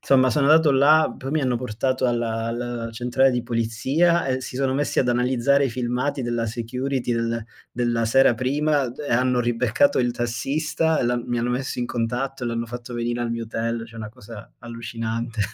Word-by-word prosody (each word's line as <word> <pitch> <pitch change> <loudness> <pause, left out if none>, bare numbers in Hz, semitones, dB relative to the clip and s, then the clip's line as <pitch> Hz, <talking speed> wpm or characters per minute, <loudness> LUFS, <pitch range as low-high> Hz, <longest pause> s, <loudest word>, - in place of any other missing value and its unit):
Insomma, 130 -1 +4
sono 140 +4 +2
andato 155 -2 +6
là, 150 +4 +4
poi 135 0 -6
mi 155 +1 +1
hanno 125 -3 +1
portato 130 +2 -2
alla 115 -1 -1
alla 120 0 -4
centrale 125 +3 +2
di 125 -2 -1
polizia 130 +9 +1
e 130 0 0
si 125 - -7
sono 135 -1 0
messi 145 +2 -1
ad 125 - +2
analizzare 125 +3 +2
i 130 - -4
filmati 125 +3 -2
della 120 -1 -1
security 125 +2 -2
del 115 -1 -1 0.3
della 120 -1 0
sera 130 +1 +4
prima 140 +1 0
e 145 -1 -5
hanno 125 +1 +2
ribeccato 120 - +2
il 120 -1 +1
tassista 145 +7 -1
e - - 0
l'han 120 0 0
mi 120 0 -1
hanno 120 +1 -1
messo 125 +1 -3
in 120 - -1
contatto 125 +3 -3
e - - -1
l'hanno 115 0 -2
fatto 120 +1 -7
venire 120 0 -2
al 120 - -2
mio 115 0 -3
hotel. 115 +1 -3
Cioè, 115 - -16
una 110 -1 -6
cosa 115 -2 -12
allucinante. 115 -1 -5
120 Hz, 195 wpm, -23 LUFS, 115-135 Hz, 0.3 s, andato